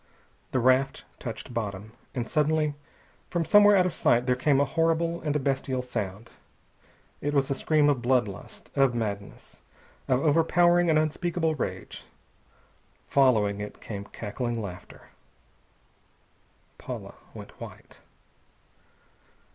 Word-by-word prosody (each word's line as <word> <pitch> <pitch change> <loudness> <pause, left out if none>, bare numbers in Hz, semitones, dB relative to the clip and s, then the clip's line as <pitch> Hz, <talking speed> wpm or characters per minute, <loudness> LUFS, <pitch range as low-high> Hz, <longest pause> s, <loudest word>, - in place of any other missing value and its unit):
The - - -1
raft 130 +2 +2 0.2
touched 120 +1 -7
bottom. 105 -2 -4 0.2
And 120 -2 -2
suddenly 150 0 +1 0.6
from 170 -2 -1
somewhere 205 +2 +7
out 185 -2 +4
of 185 - -1
sight 120 +1 +2
there 125 -1 +2
came 135 +2 +2
a 140 - +3
horrible 165 +3 0
and 150 -2 -2
a - - +2
bestial 135 -1 -1
sound. 110 -3 -5 0.9
It 145 +1 -1
was 135 -1 +2
a - - +4
scream 150 +2 +2
of 140 -4 +2
blood 125 -2 +2
lust, 100 - -11
of 135 -3 +3
madness, 100 -3 -5 0.5
of 130 -1 +2
overpowering 175 +3 +3
and 155 - +4
unspeakable 160 +1 0
rage. 150 - -5 1.1
Following 110 -7 +3
it 105 - -7
came 100 -2 -7
cackling 115 +3 -4
laughter. 90 -4 -9 1.7
Paula - - -7 0.2
went - - -9
white. - - -11
135 Hz, 125 wpm, -27 LUFS, 115-155 Hz, 1.7 s, somewhere